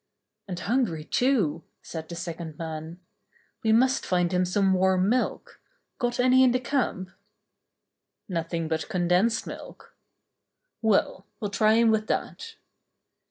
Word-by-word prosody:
"And 180 -2 -5
hungry, 215 -9 0
too," 190 - +1 0.2
said 160 -1 -7
the 170 - -6
second 170 -3 -6
man. 160 +1 -6 0.6
"We 220 - +3
must 255 +4 +3
find 180 -2 +1
him 180 0 +2
some 190 +1 +2
warm 185 0 +2
milk. 250 +2 -2 0.4
Got 245 -2 -1
any 255 +1 +5
in 250 -2 +4
the 255 - +2
camp 250 -9 -2 0.6
?" - - -58
"Nothing 165 -2 -3
but 160 0 -2
condensed 180 +5 +1
milk." - - -10 0.9
"Well, 205 -2 +1
we'll 205 -2 -3
try 215 +1 +3
him 230 0 +4
with 215 0 0
that." 455 -1 -3
190 Hz, 135 wpm, -26 LUFS, 170-235 Hz, 0.9 s, any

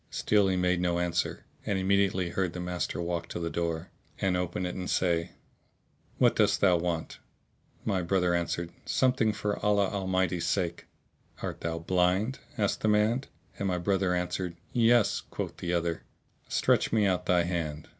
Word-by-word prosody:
Still 105 -2 +2
he 95 -1 +1
made 90 0 +2
no 90 -1 +1
answer 90 0 -1 0.2
and 100 - -1
immediately 95 -1 +2
heard 90 0 -1
the 90 - -5
master 90 0 -3
walk 85 0 -2
to - - -5
the 85 -1 -3
door 85 0 -2 0.3
and 95 -2 +1
open 90 0 -2
it 90 - -3
and 90 -1 -5
say, 85 -2 +1 0.8
"What - - +4
dost - - +3
thou 90 -3 +5
want?" 85 -1 -3 0.7
My 95 -2 +1
brother 90 0 +1
answered 85 0 -1
"Something 125 -4 +2
for 105 0 -3
Allah 100 -2 +3
Almighty's 95 -3 0
sake."[FN#650] 90 -2 -5
"Art - - -4
thou 80 0 -2
blind?" 90 +8 +1 0.2
asked 100 -3 0
the - - +1
man, 110 +5 +2 0.3
and 100 - -1
my 90 -1 0
brother 95 0 +1
answered 90 0 -2 0.2
"Yes." 120 -2 +4
Quoth - - -5
the 85 - -3
other, 85 -1 0 0.5
"Stretch - - +2
me 110 -2 +3
out 90 -2 0
thy 90 -1 +4
hand." 80 -4 -3
90 Hz, 165 wpm, -29 LUFS, 85-100 Hz, 0.8 s, thou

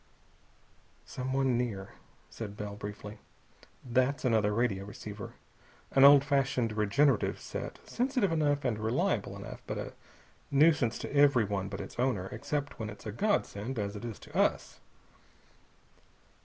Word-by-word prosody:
"Someone 130 -1 0
near," 100 -6 -3 0.3
said 105 -2 -7
Bell 105 -1 -5
briefly. 105 +1 -8 0.7
"That's 130 +3 +1
another 110 -4 +3
radio 105 -3 0
receiver, 105 0 -8 0.6
an 135 - +5
old 140 0 +9
fashioned 135 -5 +1
regenerative 110 +4 +2
set, - - -6
sensitive 250 -6 0
enough 145 -3 +1
and 115 -4 0
reliable 110 +2 0
enough, - - -8
but - - -3
a - - -5 0.6
nuisance 145 -5 +4
to - - -6
everyone 110 -9 +3
but 95 - -5
its - - -9
owner 120 -7 0
except 145 +5 -3
when 110 -1 -3
it's 105 - -11
a 105 - -3
godsend, 125 - -1
as 100 -1 -2
it 105 - -7
is 115 -3 -5
to - - -14
us." - - +1
120 Hz, 135 wpm, -31 LUFS, 105-140 Hz, 0.7 s, old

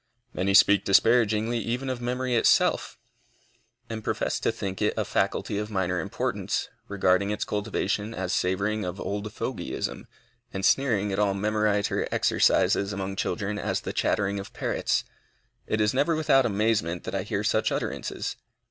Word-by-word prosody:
Many 95 +1 +1
speak 100 0 +6
disparagingly 115 +2 +3
even 120 +4 -3
of 130 -2 -3
memory 125 +1 -1
itself, 115 - +3 0.9
and 110 -1 -6
profess - - -1
to - - +1
think 95 -2 -5
it - - +1
a - - 0
faculty 100 - -1
of 105 0 -4
minor 95 -3 -1
importance, 80 - -2 0.2
regarding 100 0 +2
its 105 - -2
cultivation 105 0 -2
as 90 -1 -2
savoring 100 +4 0
of 90 +1 -5
old 105 +1 -4
fogyism, - - -4 0.4
and 95 0 -2
sneering 110 -7 +2
at 95 - -1
all 100 -2 +2
memoriter 105 0 0
exercises 100 0 +2
among 95 -1 -4
children 105 +1 -2
as - - -1
the - - -5
chattering 100 0 0
of 100 - -9
parrots. - - 0 0.6
It 110 - 0
is 105 +2 +2
never 145 +5 +2
without 140 -5 +3
amazement 100 -5 0
that - - -6
I 95 - 0
hear 100 +1 -2
such 110 +1 +1
utterances. - - -3
105 Hz, 155 wpm, -26 LUFS, 100-110 Hz, 0.9 s, speak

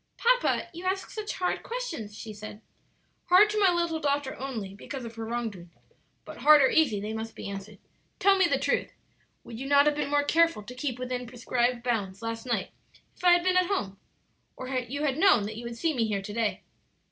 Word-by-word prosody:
"Papa, - - +2
you 345 +2 -8
ask 380 +1 -2
such 430 -1 -4
hard 360 - -1
questions," 330 - -5
she 220 - -7
said. 210 +1 -10 0.6
"Hard 390 +4 +6
to 425 - 0
my 390 -3 +5
little 340 -2 0
daughter 285 -2 -1
only 230 -8 -5
because 255 +5 -7
of 230 - -8
her 225 0 -6
own - - -7
wrong 240 -1 -1
doing. 175 -3 -13 0.5
But - - -10
hard 300 -1 +7
or 265 - +4
easy, 265 -11 +3
they 210 +2 -4
must 225 0 -5
be - - -7
answered. 200 +1 -7 0.4
Tell 395 -1 +5
me 380 -2 +4
the - - +1
truth, - - -1 0.5
would 230 -1 -9
you 270 - -5
not 285 0 +5
have 300 - +3
been 295 - -2
more 290 0 +2
careful 330 -5 +2
to 245 - -9
keep 255 -1 -3
within 250 -1 -4
prescribed 240 0 -1
bounds 205 -4 -2
last 230 +1 -4
night 240 - -1 0.4
if - - -18
I 355 -1 +7
had 350 0 +3
been 365 0 +2
at 365 -1 +3
home, 200 - -2 0.6
or 255 - -6
you 260 +2 -3
had 285 0 0
known 330 - +5
that 210 +2 -5
you 235 +2 -7
would 235 0 -6
see 320 +6 0
me 230 -5 0
here 200 -2 -2
to 205 +1 -7
day?" 225 -1 -1
255 Hz, 225 wpm, -28 LUFS, 225-330 Hz, 0.6 s, hard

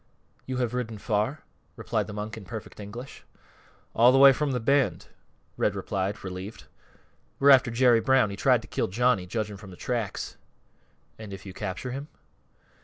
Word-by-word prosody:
"You 130 -1 -3
have 125 -2 -1
ridden 120 -3 -3
far?" 110 +8 -1 0.3
replied - - -2
the - - -7
monk 105 +1 -5
in 110 - -9
perfect 110 +3 -8
English. 115 +6 -9 0.7
"All 120 +2 +6
th' 135 - +4
way 135 0 +9
from 150 +1 -1
th' 125 -3 -3
Bend," 140 0 +1 0.5
Red 105 - +1
replied, 100 +1 -3
relieved. 95 +3 -7 0.7
"We're 140 +1 +6
after 130 -2 +6
Jerry 120 0 +4
Brown. 130 -5 +3
He - - -5
tried 125 +2 +3
to - - -12
kill - - -1
Johnny, 115 -2 +1
judgin' 105 +1 -3
from 95 -1 -12
th' 90 - -12
tracks." 115 -5 -3 0.8
"And 110 -2 -8
if 95 0 -9
you 95 - -8
capture 105 +6 -5
him?" 140 +3 -5
115 Hz, 175 wpm, -27 LUFS, 100-125 Hz, 0.8 s, way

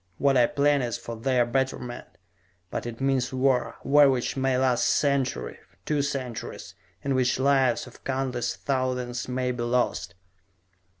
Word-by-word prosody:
What 140 -1 +3
I 120 -2 +5
plan 145 0 +2
is 120 -2 -2
for 115 - -7
their 125 +1 +1
betterment. 125 0 -2 0.6
But - - -3
it 115 -1 -7
means 135 -2 +1
war, 130 -1 +1
war 145 0 +6
which 130 -2 0
may 130 -1 +1
last 130 -2 +2
a - - +4
century, 140 -3 0 0.3
two 150 -2 +1
centuries, 135 -5 -5 0.3
in 140 - 0
which 130 -1 +2
lives 135 -2 +2
of 125 - -15
countless 130 -3 -2
thousands 125 -2 -2
may 125 0 -1
be 120 -1 -4
lost." 120 -7 0
130 Hz, 155 wpm, -26 LUFS, 120-135 Hz, 0.6 s, war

